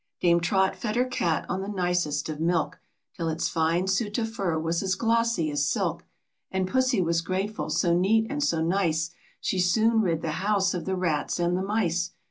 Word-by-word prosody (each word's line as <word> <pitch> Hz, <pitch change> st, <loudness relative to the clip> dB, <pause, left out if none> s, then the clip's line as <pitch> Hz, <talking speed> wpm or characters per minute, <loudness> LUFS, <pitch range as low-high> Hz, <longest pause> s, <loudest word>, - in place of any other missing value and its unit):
Dame 170 Hz, -1 st, +4 dB
Trot 190 Hz, +3 st, +1 dB
fed 215 Hz, -1 st, -3 dB
her 250 Hz, +1 st, +3 dB
cat 175 Hz, -, -1 dB
on 190 Hz, +1 st, -2 dB
the 195 Hz, -, -5 dB
nicest 180 Hz, -6 st, -1 dB
of 155 Hz, -1 st, -5 dB
milk, 165 Hz, -1 st, 0 dB, 0.3 s
Till 165 Hz, -1 st, -3 dB
its 160 Hz, +1 st, -1 dB
fine 165 Hz, +3 st, +1 dB
suit 205 Hz, +2 st, 0 dB
of 225 Hz, -1 st, -2 dB
fur 185 Hz, -7 st, -1 dB
was 165 Hz, +1 st, -1 dB
as 190 Hz, -1 st, 0 dB
glossy 230 Hz, -7 st, +1 dB
as 145 Hz, 0 st, +1 dB
silk, -, -, -1 dB, 0.4 s
And 190 Hz, -1 st, -1 dB
Pussy 255 Hz, -2 st, +2 dB
was 165 Hz, 0 st, +1 dB
grateful, 195 Hz, +5 st, -3 dB
so 170 Hz, -3 st, +2 dB
neat 215 Hz, +5 st, +3 dB
and 290 Hz, +3 st, -2 dB
so 165 Hz, -, +1 dB
nice, 165 Hz, -2 st, 0 dB, 0.3 s
She 190 Hz, -, -1 dB
soon 220 Hz, +6 st, +3 dB
rid 165 Hz, -5 st, 0 dB
the 160 Hz, -, -1 dB
house 200 Hz, -1 st, +2 dB
of 180 Hz, -, -4 dB
the 190 Hz, -, -1 dB
rats 175 Hz, -3 st, -1 dB
and 175 Hz, +1 st, +1 dB
the 185 Hz, -, -1 dB
mice. 185 Hz, -4 st, 0 dB
185 Hz, 200 wpm, -26 LUFS, 165-210 Hz, 0.4 s, Dame